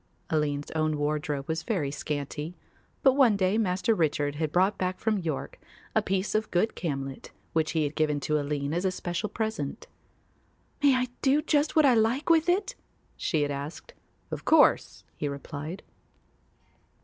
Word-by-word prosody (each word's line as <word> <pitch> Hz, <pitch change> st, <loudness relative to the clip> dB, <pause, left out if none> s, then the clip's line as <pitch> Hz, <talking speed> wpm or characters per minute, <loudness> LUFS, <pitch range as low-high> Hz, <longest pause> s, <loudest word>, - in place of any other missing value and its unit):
Aline's 145 Hz, -2 st, 0 dB
own 155 Hz, -1 st, 0 dB
wardrobe 145 Hz, -1 st, -2 dB
was 160 Hz, 0 st, -1 dB
very 165 Hz, -, -1 dB
scanty, 150 Hz, +3 st, -4 dB, 0.5 s
but 265 Hz, -, +6 dB
one 255 Hz, -7 st, +4 dB
day 195 Hz, +3 st, +2 dB
Master 190 Hz, +1 st, +1 dB
Richard 145 Hz, -5 st, 0 dB
had 155 Hz, -1 st, -1 dB
brought 190 Hz, +4 st, +3 dB
back 185 Hz, 0 st, -1 dB
from 215 Hz, -2 st, +1 dB
York 160 Hz, -6 st, -4 dB, 0.3 s
a -, -, +3 dB
piece 190 Hz, +1 st, -1 dB
of 215 Hz, 0 st, 0 dB
good 180 Hz, +6 st, +1 dB
camlet 135 Hz, -5 st, -4 dB, 0.2 s
which 160 Hz, 0 st, +1 dB
he 160 Hz, -2 st, +2 dB
had 145 Hz, 0 st, -2 dB
given 150 Hz, -2 st, +1 dB
to 150 Hz, +1 st, +1 dB
Aline 145 Hz, 0 st, -2 dB
as 175 Hz, +2 st, -1 dB
a 190 Hz, -, +2 dB
special 180 Hz, +2 st, -3 dB
present. 220 Hz, -8 st, -3 dB, 1.0 s
"May 280 Hz, -2 st, +5 dB
I 255 Hz, 0 st, +1 dB
do 275 Hz, +2 st, +4 dB
just 295 Hz, 0 st, +1 dB
what 310 Hz, -2 st, +6 dB
I 265 Hz, -, +6 dB
like 235 Hz, +8 st, +2 dB
with 330 Hz, +1 st, +4 dB
it?" 395 Hz, +7 st, +1 dB, 0.4 s
she 155 Hz, -3 st, 0 dB
had 145 Hz, -, -1 dB
asked. 140 Hz, +3 st, -6 dB, 0.4 s
"Of -, -, -4 dB
course," -, -, +4 dB
he 150 Hz, -, -2 dB
replied. 145 Hz, +5 st, -6 dB
165 Hz, 165 wpm, -28 LUFS, 145-220 Hz, 1.0 s, but